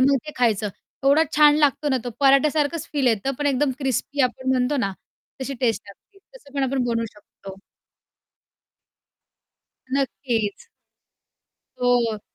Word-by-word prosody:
मग 275 +1 +4
ते 300 - -6
खायचं. 220 -4 +1 0.4
एवढा 285 +4 +5
छान 295 -1 +7
लागतो 290 0 +2
ना 260 - +2
तो 245 - -3
पराठ्यासारखंच 290 +3 +3
फील 280 -3 0
येतं 235 +4 +1
पण 290 - -1
एकदम 275 0 +2
क्रिस्पी 275 +1 -2
आपण 255 +1 -1
म्हणतो 255 +3 +1
ना 200 -6 -1 0.5
तशी 270 +1 -4
टेस्ट 225 -5 +1
लागते 390 - -18 0.2
तसं 285 - -19
पण 275 - 0
आपण 265 -1 0
बनवू 230 -1 0
शकतो. 195 -2 -13 2.4
नक्कीच. 250 - -2 1.1
हो. 240 -3 +2
265 Hz, 130 wpm, -23 LUFS, 235-285 Hz, 2.4 s, छान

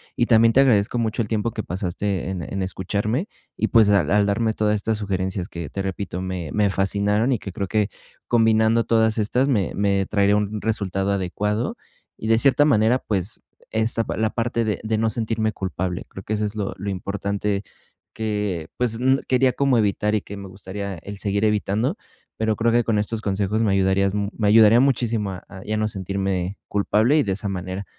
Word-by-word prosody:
y 120 - +2
también 115 -1 +5
te 135 - +6
agradezco 115 -3 +3
mucho 115 0 0
el 105 - -2
tiempo 110 +1 -1
que 110 -2 -4
pasaste 95 0 -3
en 90 - -4
en 95 +5 -3
escucharme 100 - -2 0.3
y, 110 - 0
pues, 110 -2 +5
al 100 -1 +3
al 105 0 +3
darme 110 +2 +1
todas 105 -1 +1
estas 110 +1 -1
sugerencias 95 -2 -2
que, 85 -4 -7
te 95 - -4
repito, 95 -1 -4
me 90 -4 -4
me 105 -2 +2
fascinaron 105 +5 +1
y 125 - +2
que 100 - -7
creo 100 +2 -3
que 105 0 +1 0.4
combinando 110 0 +3
todas 110 -1 +2
estas, 125 +6 +2
me 105 -10 +1
me 100 -1 +1
traería 100 0 +3
un 105 +1 -2
resultado 100 -3 -1
adecuado, 105 +4 -1 0.4
y 110 - -5
de 115 0 +4
cierta 140 +3 +4
manera, 115 -3 +4
pues, 100 -4 -3 0.3
esta 110 +1 0
pa - - -4
la 110 0 +1
parte 115 0 -1
de 105 -2 -1
de 110 0 0
no 110 0 +1
sentirme 110 -2 -1
culpable, 95 -2 -4
creo 95 - -10
que 110 - -3
eso 105 0 0
es 105 - -4
lo 105 -2 -3
lo 100 +1 -4
importante 100 +1 -2 0.5
que, 105 -7 -2
pues, 120 -2 0
n 130 +2 +3
quería 130 0 +3
como 135 -3 +2
evitar 105 0 +1
y 105 - 0
que 100 - -9
me 100 -1 -8
gustaría 95 +1 -6
el 100 +4 -9
seguir 100 +1 0
evitando, 105 - 0 0.4
pero 110 -1 0
creo 115 +1 +1
que 120 0 +3
con 110 -2 0
estos 110 +1 -2
consejos 100 +1 0
me 105 - +2
ayudarías 95 0 +2
mu 100 -1 -1
me 105 -2 +1
ayudaría 110 +2 +7
muchísimo 120 -6 +1
a 90 - -8
a 95 -1 -11
ya 110 +1 -2
no 110 0 +1
sentirme 95 -1 -2
culpable 110 +7 +2
y - - +3
de 95 -3 -1
esa 100 +1 -4
manera, 95 +1 -4
105 Hz, 205 wpm, -23 LUFS, 100-110 Hz, 0.5 s, ayudaría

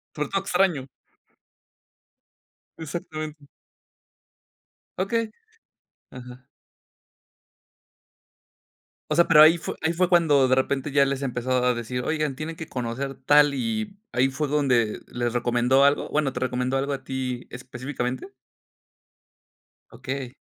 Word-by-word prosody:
Sobre 150 -1 -3
todo 195 0 0
extraño. 180 -8 +1 1.9
Exactamente. 155 -1 -6 1.5
Okey. 220 +4 -1 0.8
Ajá. 125 0 -11 2.7
O 150 - 0
sea, 170 - +4
pero 150 -2 +7
ahí 160 +2 +8
fue - - -5
ahí 160 - +1
fue 180 +1 +2
cuando 150 -7 +4
de 130 - +3
repente 135 +2 -1
ya 140 0 +4
les 135 0 -2
empezó 125 -1 -3
a 125 - +3
decir: 120 +1 -4
"Oigan, 155 -1 -1
tienen 155 +3 -5
que 160 -1 -8
conocer 130 +1 -4
tal". 145 +2 +4
Y 220 +5 -3 0.2
ahí 125 +3 +3
fue 135 +3 -2
donde 130 -7 +1
les 120 -1 -3
recomendó 120 +2 +2
algo 140 +1 +2
Bueno, 150 -3 0
¿te - - -4
recomendó 125 +1 -1
algo 140 +1 -1
a 135 - -5
ti 130 -2 -4
específicamente? 130 0 -5 1.6
Okey. 130 +1 -6
135 Hz, 120 wpm, -25 LUFS, 125-155 Hz, 2.7 s, ahí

